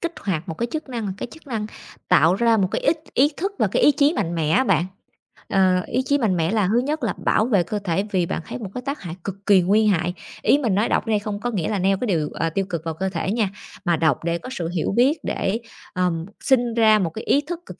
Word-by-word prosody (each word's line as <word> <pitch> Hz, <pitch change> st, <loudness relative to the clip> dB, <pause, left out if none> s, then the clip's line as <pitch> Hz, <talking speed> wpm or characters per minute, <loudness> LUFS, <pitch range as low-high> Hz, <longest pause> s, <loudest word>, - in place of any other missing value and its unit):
kích 340 Hz, 0 st, -2 dB
hoạt 180 Hz, -5 st, -3 dB
một 165 Hz, -, -3 dB
cái 235 Hz, -, 0 dB
chức 315 Hz, -2 st, -4 dB
năng 235 Hz, -5 st, -4 dB
một 190 Hz, -, -2 dB
cái -, -, -5 dB
chức 320 Hz, -1 st, -15 dB
năng 225 Hz, -5 st, -3 dB, 0.4 s
tạo 175 Hz, -1 st, +5 dB
ra 230 Hz, +2 st, +3 dB
một 190 Hz, -3 st, +1 dB
cái -, -, -1 dB
ích 310 Hz, +3 st, +2 dB, 0.2 s
ý 275 Hz, +3 st, +5 dB
thức 390 Hz, +4 st, -2 dB
và -, -, +3 dB
cái -, -, 0 dB
ý 295 Hz, -, +7 dB
chí 285 Hz, +2 st, +3 dB
mạnh 170 Hz, +1 st, -1 dB
mẽ 160 Hz, -2 st, 0 dB
á 215 Hz, +11 st, +4 dB
bạn. 175 Hz, -, +2 dB, 0.7 s
Ờ, 185 Hz, -2 st, +3 dB
ý 255 Hz, -, 0 dB
chí 285 Hz, +2 st, +1 dB
mạnh 210 Hz, -9 st, +1 dB
mẽ 165 Hz, +2 st, +1 dB
là 215 Hz, -4 st, +2 dB
thứ 225 Hz, +5 st, +3 dB
nhất 295 Hz, +5 st, -2 dB
là -, -, 0 dB
bảo 215 Hz, -, +3 dB
vệ 205 Hz, -7 st, +2 dB
cơ 210 Hz, +4 st, -3 dB
thể, 190 Hz, 0 st, 0 dB
vì 185 Hz, -4 st, +1 dB
bạn 165 Hz, -, -3 dB
thấy -, -, -6 dB
một 210 Hz, -5 st, -6 dB
cái 250 Hz, -, -3 dB
tác 280 Hz, +2 st, -3 dB
hại 175 Hz, -4 st, -6 dB
cực 195 Hz, -, -4 dB
kỳ 195 Hz, -3 st, +6 dB
nguy 205 Hz, +5 st, +3 dB
hại. 180 Hz, -2 st, +1 dB, 0.3 s
Ý -, -, +4 dB
mình 235 Hz, -9 st, 0 dB
nói 210 Hz, +3 st, +1 dB
đọc -, -, +1 dB
ở -, -, -3 dB
đây 215 Hz, -2 st, +2 dB
không 205 Hz, 0 st, -4 dB
có 245 Hz, +3 st, -2 dB
nghĩa 185 Hz, -8 st, -2 dB
là 205 Hz, -, -1 dB
neo 195 Hz, +1 st, +2 dB
cái 250 Hz, -, -3 dB
điều, 160 Hz, -7 st, 0 dB
ờ, 165 Hz, -, -1 dB
tiêu 195 Hz, +4 st, -1 dB
cực 170 Hz, -4 st, -3 dB
vào 165 Hz, -, -2 dB
cơ 190 Hz, +4 st, -2 dB
thể 190 Hz, +1 st, -2 dB
nha, 220 Hz, -4 st, +1 dB, 0.4 s
mà 175 Hz, -2 st, +3 dB
đọc 155 Hz, -3 st, +1 dB
để 170 Hz, 0 st, 0 dB
có 255 Hz, -, -9 dB
sự 175 Hz, -10 st, -3 dB
hiểu 175 Hz, -2 st, -1 dB
biết 265 Hz, +7 st, +4 dB
để, 205 Hz, +4 st, -1 dB, 0.3 s
ờ, 180 Hz, -1 st, +1 dB, 0.3 s
sinh 245 Hz, -3 st, +2 dB
ra 220 Hz, -2 st, +5 dB
một 175 Hz, -, 0 dB
cái 220 Hz, +7 st, -8 dB
ý 285 Hz, -, +3 dB
thức 335 Hz, +3 st, -6 dB
cực -, -, -11 dB
205 Hz, 285 wpm, -22 LUFS, 180-245 Hz, 0.7 s, ý